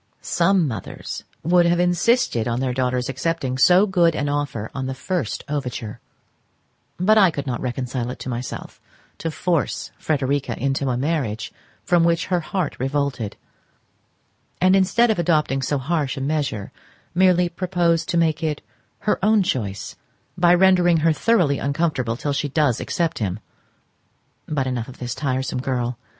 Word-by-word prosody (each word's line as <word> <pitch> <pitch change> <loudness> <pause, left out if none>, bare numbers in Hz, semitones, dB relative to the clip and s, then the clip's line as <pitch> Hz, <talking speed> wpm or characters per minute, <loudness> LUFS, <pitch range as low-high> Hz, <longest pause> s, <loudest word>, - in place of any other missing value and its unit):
Some 180 -1 +2
mothers 110 -8 -6 0.2
would 175 +1 +4
have 175 0 +2
insisted 180 - +2
on 120 0 -1
their 130 -1 -1
daughter's 125 -1 0
accepting 135 -3 -2
so 180 +7 +6
good 175 -5 +3
an 145 -1 -1
offer 140 -7 -2
on 130 -1 -3
the 130 - -4
first 165 - -3
overture; 125 -7 -4 1.0
but 215 +4 +5
I 190 -3 +6
could 145 -3 -4
not 125 -3 -3
reconcile 125 -1 -3
it 125 - -6
to - - -6
myself 125 0 -6 0.4
to 165 - -2
force 170 0 -1
Frederica 140 -4 -1
into 135 +1 -1
a 125 - 0
marriage 130 -6 -2 0.3
from 175 -2 +3
which 170 0 +2
her 180 - +3
heart 170 0 -2
revolted, 135 -5 -2 1.2
and 185 +1 +5
instead 205 +5 +3
of 215 - -1
adopting 155 -5 +1
so 145 +3 0
harsh 145 0 -1
a - - -3
measure 140 -8 -2 0.4
merely 180 0 +4
propose 170 -2 0
to 170 - 0
make 160 -2 +2
it 155 -2 -2 0.4
her 210 - 0
own 210 -1 +4
choice, 100 - -3 0.4
by 175 0 +5
rendering 175 -3 +4
her 165 - +5
thoroughly 175 -7 +2
uncomfortable 140 -5 -1
till 145 +2 -2
she 145 +1 -1
does 140 -4 +1
accept 170 -3 -1
him—but 110 +7 -7
enough 125 -3 -2
of 130 - -11
this 125 -1 -4
tiresome 130 -2 -2
girl. 125 -2 -2
145 Hz, 155 wpm, -22 LUFS, 130-175 Hz, 1.2 s, so